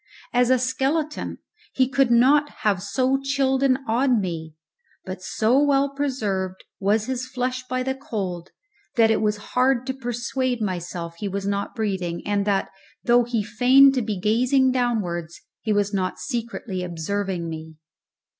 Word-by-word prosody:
As 245 0 +3
a 260 - +5
skeleton 270 +5 -1 0.4
he 260 -1 +3
could 270 -1 +2
not 275 +5 +5
have 200 -4 +2
so 255 +7 +1
chilled 275 -1 +1
and 265 -2 +4
awed 245 +2 +3
me; 165 -5 -4 0.5
but 185 0 -6
so 225 +7 +2
well 280 -1 +3
preserved 205 -10 -2 0.2
was 205 +2 +2
his 255 -1 -3
flesh 255 -1 -2
by 255 0 -1
the 265 +1 -1
cold, 190 -10 -5 0.5
that 225 -2 +5
it 220 - +2
was 210 -1 +1 0.2
hard 255 0 +2
to 265 - -2
persuade 245 0 -2
myself 175 -4 -4
he 205 - -3
was 195 0 -3
not 200 0 -2
breathing, 190 -6 -2
and 205 -1 0
that, 200 -2 0 0.3
though 240 0 +4
he 230 -3 -1
feigned 255 +6 +6
to 255 - 0
be 210 -4 -3
gazing 255 +6 +3
downwards, 200 -10 -1 0.2
he 220 - -1
was 205 0 +1
not 185 -2 -1
secretly 235 -6 -4
observing 180 +1 -3
me. 160 0 -7
230 Hz, 155 wpm, -23 LUFS, 195-260 Hz, 0.5 s, feigned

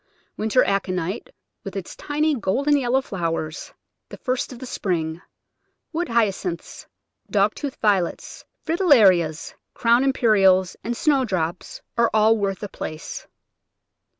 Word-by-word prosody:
Winter 220 +4 +2
Aconite, 185 -1 -2 0.3
with 195 -3 -7
its 195 -3 -6
tiny, 300 +1 0
golden 275 +5 +1
yellow 265 -1 +2
flowers, 165 -7 -4 0.4
the - - -9
first 255 +1 -2
of 250 - -9
the 260 - -8
spring; 170 -8 -2 0.7
Wood 345 +2 -2
Hyacinths, 200 -7 -1 0.4
Dog - - +2
tooth 285 -3 -5
Violets, 195 -5 -1 0.2
Fritil 340 +3 0
larias, 180 - +4 0.2
Crown 235 +2 +3
Imperials, 195 -8 +3
and 235 +2 -3
Snowdrops 190 - -1 0.2
are 235 - +4
all 220 +1 +5
worth 200 -2 -2
a - - -2
place. 155 -5 -7
210 Hz, 125 wpm, -23 LUFS, 185-255 Hz, 0.7 s, all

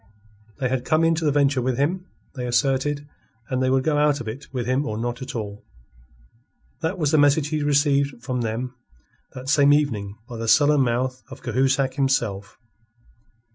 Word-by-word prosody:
They 130 - 0
had 125 -1 -1
come 155 +4 +2
into 165 0 +2
the 150 - +3
venture 140 -2 +2
with 125 0 -1
him, 180 +6 -1 0.3
they 125 -3 -4
asserted, 135 +3 0 0.4
and 130 0 0
they 130 - +2
would 130 0 +2
go 150 -1 +1
out 150 -1 +3
of 120 - -7
it 120 +6 -7
with 125 -3 -3
him 130 +3 +1
or 110 -6 -4
not 120 +2 -3
at 130 - -6
all. 105 -2 -5 1.2
That 165 +4 -1
was 150 -5 0
the 155 - +4
message 145 +1 +3
he 155 -1 -1
received 140 -3 +1
from 125 -2 -2
them 120 +3 -3 0.6
that 130 0 -8
same 145 0 +5
evening 110 -9 0
by 120 - -8
the 115 0 -4
sullen 145 +3 +5
mouth 130 +1 -1
of 130 - -11
Cahusac 135 +1 +1
himself. 120 -8 -1
135 Hz, 180 wpm, -23 LUFS, 125-145 Hz, 1.2 s, same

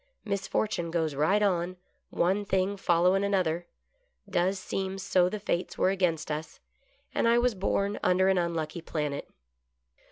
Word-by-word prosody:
Misfortune 200 -3 -1
goes 160 -2 0
right 160 +9 +2
on, 180 -2 0 0.3
one 190 +4 +1
thing 190 0 0
followin 180 +1 +3
another; 175 -4 0 0.6
does 185 +3 +1
seem's 190 0 -4
so 180 -2 +3
the 215 - -4
Fates 180 -3 -2
were 185 - +3
against 170 -5 0
us, 155 +1 -5 0.5
and - - +2
I 235 +1 +5
was 245 0 +3
born 200 +1 -1
under 185 +1 +3
an 190 -1 +3
unlucky 165 -1 -2
planet. 150 -3 -3
185 Hz, 140 wpm, -28 LUFS, 170-195 Hz, 0.6 s, I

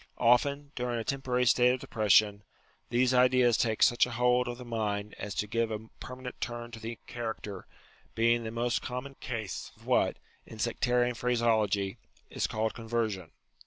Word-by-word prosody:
Often, 140 +4 +2
during 125 -2 -2
a - - -3
temporary 125 -1 0
state 125 +1 +5
of - - -8
depres 110 -2 -2
sion, 105 0 +5 0.5
these 125 +1 +2
ideas 125 -1 +5
take 110 -1 +2
such 120 +1 +5
a 125 - -6
hold 125 +1 +2
of 120 0 -4
the 125 - -9
mind 105 -3 -2
as 100 0 -5
to - - 0
give 115 +2 0
a 110 - -2 0.2
permanent 125 0 -8
turn 120 -1 -4
to 115 - -8
the 115 +1 -6
character; 110 -5 -6 0.5
being 115 +1 +3
the 110 - -4
most 120 +1 -1
common 125 +3 -5
case 110 -6 -5
of - - -19
what, - - +2 0.3
in 110 - -12
sectarian 120 +2 +1
phraseology, 110 -5 +1 0.3
is - - -1
called 110 0 -1
conversion. 110 -6 -2
120 Hz, 170 wpm, -30 LUFS, 110-125 Hz, 0.5 s, state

